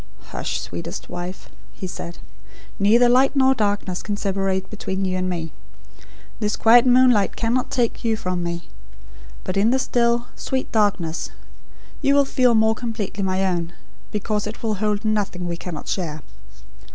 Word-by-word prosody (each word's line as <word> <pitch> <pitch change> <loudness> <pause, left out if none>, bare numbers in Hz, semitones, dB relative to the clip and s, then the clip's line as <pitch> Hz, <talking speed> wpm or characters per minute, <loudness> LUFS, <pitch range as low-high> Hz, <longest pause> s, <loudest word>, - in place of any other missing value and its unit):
"Hush, - - -3
sweetest 85 -1 -6
wife," 180 +1 -6 0.3
he - - -7
said. 175 -1 -6 0.6
"Neither 225 +5 +5
light 260 +3 +4
nor 265 -1 +5
darkness 205 -5 -1
can 205 -1 -3
separate 195 -1 -1
between 195 -2 -3
you 185 0 -1
and 185 0 -1
me: 165 -3 -3 0.9
This 210 -2 0
quiet 235 +2 +6
moonlight 250 -5 +5
cannot 240 +2 0
take 245 -2 0
you 225 -2 +1
from 185 -3 -2
me; 170 0 -4 0.8
but 185 - -3
in 205 +3 +4
the 260 - +3
still, 235 -2 +1
sweet 260 -1 -3
darkness 200 -7 0 0.7
you 275 - +3
will 285 -1 +5
feel 250 -3 +3
more 220 0 +4
completely 220 -3 -4
my 190 0 +1
own, 175 -2 -1 0.4
because 210 0 -1
it 220 +3 -8
will 220 -1 +1
hold 210 0 0
nothing 200 -4 -1
we 170 - -2
cannot 170 -2 -7
share. 155 -5 -3
205 Hz, 155 wpm, -22 LUFS, 185-235 Hz, 0.9 s, quiet